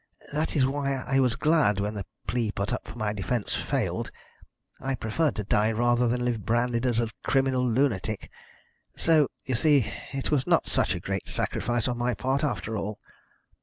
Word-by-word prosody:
That 155 +3 -1
is 135 -4 +4
why 140 0 0
I 135 +1 0
was 125 -3 +3
glad 150 -10 +3
when 105 +1 -1
the 100 -4 -5 0.2
plea 115 -2 0
put 100 -1 -2
up - - -4
for - - -9
my 105 -2 -1
defence 105 +2 -2
failed. - - -1 0.7
I 135 0 -1
preferred 135 +8 0
to 105 - -2
die 105 +2 +2
rather 120 +2 +2
than 125 +1 0
live 115 -4 -1
branded 120 +1 +1
as 120 -2 +2
a 115 -1 0
criminal 130 -2 +2
lunatic. 110 -5 0 0.7
So, 155 -4 +4 0.2
you 130 - -1
see, 140 -1 +3 0.2
it 135 -1 -3
was 140 -4 +1
not - - +3
such - - +1
a - - -3
great - - -3
sacrifice 120 -1 -1
on 120 -1 -2
my 120 -1 +1
part, 130 +7 0
after 110 -5 -1
all." 105 0 -3
120 Hz, 185 wpm, -27 LUFS, 110-135 Hz, 0.7 s, is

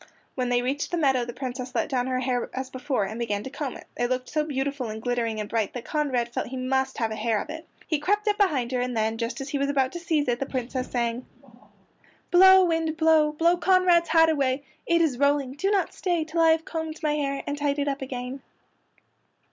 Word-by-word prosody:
When 250 -2 -2
they 245 0 +2
reached 275 +4 -2
the 350 - -1
meadow 265 -6 +2
the 240 - -5
Princess 255 0 -6
let - - +1
down 255 -2 -1
her 255 0 -1
hair 250 -1 -1
as 260 0 -4
before 255 -3 -1
and 215 +4 -6
began 210 -3 -2
to 265 - -7
comb 285 -5 -4
it. - - -14
It 240 0 -1
looked 255 0 -2
so 305 0 0
beautiful 275 -4 -3
and 215 0 -5
glittering 230 -2 -1
and 210 - -3
bright 220 -2 -1
that 245 - -6
Conrad 255 -6 -1
felt - - -2
he 260 - -6
must 265 +1 -1
have 225 -2 -1
a - - -3
hair 215 0 0
of - - -6
it. 320 +1 -8 0.2
He 310 -3 0
crept 415 +7 0
up 415 - +3
behind 275 -12 +2
her 250 -1 0
and 250 -1 -2
then, 220 +1 0
just 230 +3 -3
as 270 - -6
he 285 - -2
was 280 0 0
about 270 -2 +1
to 345 - -6
seize 320 -4 0
it, 240 -1 0
the 275 - -2
Princess 255 0 -3
sang: 240 0 -2 1.0
"Blow, 380 +1 +8
wind, 325 -2 0
blow! 315 -2 +4
Blow 335 +3 +3
Conrad's 355 -1 +4
hat 325 0 +5
away. 275 -2 0 0.2
It 335 0 +3
is 270 -6 0
rolling! 280 -2 +2
Do 295 +9 -1
not 405 -2 +1
stay 350 -3 0
Till 320 +2 -1
I 325 - +6
have 320 0 +2
combed 320 -1 -5
my 300 -1 +2
hair 275 -2 -2
And 285 - -2
tied 290 -1 -1
it 285 0 -1
up 275 -1 -2
again." 255 0 -5
270 Hz, 240 wpm, -26 LUFS, 245-315 Hz, 1.0 s, Blow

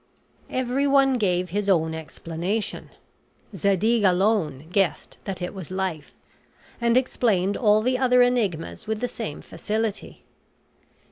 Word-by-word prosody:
Everyone 270 +1 +2
gave 180 -3 0
his 205 +1 -1
own 160 -4 +2
explanation. 170 +6 -4 0.7
Zadig 200 +5 +2
alone 180 -7 +1
guessed 195 -2 0
that 190 -3 -4
it 180 - -4
was 190 -6 -8
Life, 185 -5 -3 0.7
and 235 +1 +3
explained 205 -7 +1
all 215 -2 +3
the 255 +1 +1
other 250 -1 +5
enigmas 195 - -1
with 220 -1 -2
the 245 - -1
same 225 -10 -6
facility. 215 -1 -4
205 Hz, 120 wpm, -24 LUFS, 180-235 Hz, 0.7 s, other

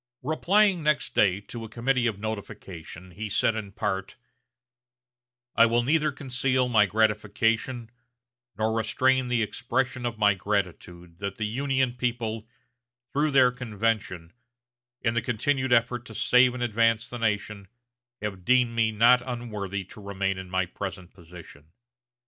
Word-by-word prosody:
Replying 185 +6 +2
next 150 -1 0
day 95 -1 +3
to 115 +3 -8
a 110 - -8
committee 120 +2 0
of 110 -4 -2
notification, 95 -4 -7
he 105 +5 -6
said 110 - +2
in 110 -3 -5
part: 95 -1 -3 1.4
"I 115 0 +6
will 120 +1 +2
neither 150 +3 +2
conceal 130 -1 0
my 110 -4 +4
gratification 110 +3 0 0.7
nor 110 +1 0
restrain 130 +3 +1
the 120 -2 +1
expression 130 +3 -2
of 115 -1 -5
my 105 -1 +4
gratitude 90 -3 -4
that 100 -1 -4
the 110 - -3
Union 130 +2 0
people, 115 -3 -3 0.7
through 150 +2 +2
their 130 -3 +5
convention, 110 -7 -3 0.7
in 115 - +1
the 115 - +1
continued 130 +4 -1
effort 120 0 +2
to 110 - -10
save 125 +2 +4
and 125 - -3
advance 115 -1 +2
the 120 - -7
nation, 105 -2 -2 0.6
have 95 -3 -4
deemed 125 +2 +3
me 110 -1 +2
not 120 +4 +5
unworthy 105 -6 -4
to 100 +3 -13
remain 100 -1 -2
in 95 -1 -9
my 95 0 0
present 90 0 -7
position. 80 -3 -14
115 Hz, 145 wpm, -26 LUFS, 100-125 Hz, 1.4 s, I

